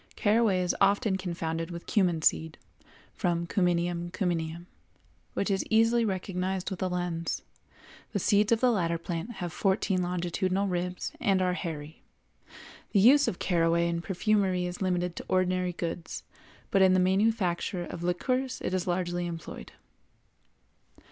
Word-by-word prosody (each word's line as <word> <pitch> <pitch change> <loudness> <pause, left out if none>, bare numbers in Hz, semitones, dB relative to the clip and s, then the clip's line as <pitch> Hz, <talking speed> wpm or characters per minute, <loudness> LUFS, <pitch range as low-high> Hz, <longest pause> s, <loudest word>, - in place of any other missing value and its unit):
Caraway 210 -3 +3
is 180 - 0
occasionally 200 +1 +3
confounded 165 -2 -3
with 170 -1 -7
cumin 175 -7 +1
seed, 160 0 +1 0.6
from 170 -3 0
Cuminum 175 -1 0
Cyminum, 170 -3 -2 0.7
which 200 - 0
is 195 - +1
easily 225 +2 +4
recognized 190 -1 -2
with 190 - -5
a 185 - +1
lens: 175 -2 -2 0.7
the - - -1
seeds 205 +2 +3
of 230 - +3
the 250 -1 +5
latter 170 -6 0
plant 170 +6 -5
have 175 -5 -5
fourteen 190 -1 +1
longitudinal 180 +2 -1
ribs 180 0 -2
and 195 -2 +3
are 180 -1 +1
hairy. 160 -4 -6 0.9
The 205 - +5
use 275 +8 +6
of 175 - -1
caraway 170 -1 +2
in 170 0 -1
perfumery 190 -1 +1
is 180 +1 -5
limited 180 -2 0
to - - -6
ordinary 185 -1 +1
goods, 170 0 -5 0.5
but 195 - +4
in 185 -1 +6
the - - +4
manufacture 185 -2 +1
of 170 - -7
liqueurs 255 +9 -1
it - - -2
is 185 -1 -1
largely 175 -1 -1
employed. 165 -1 -7
180 Hz, 145 wpm, -29 LUFS, 175-195 Hz, 0.9 s, use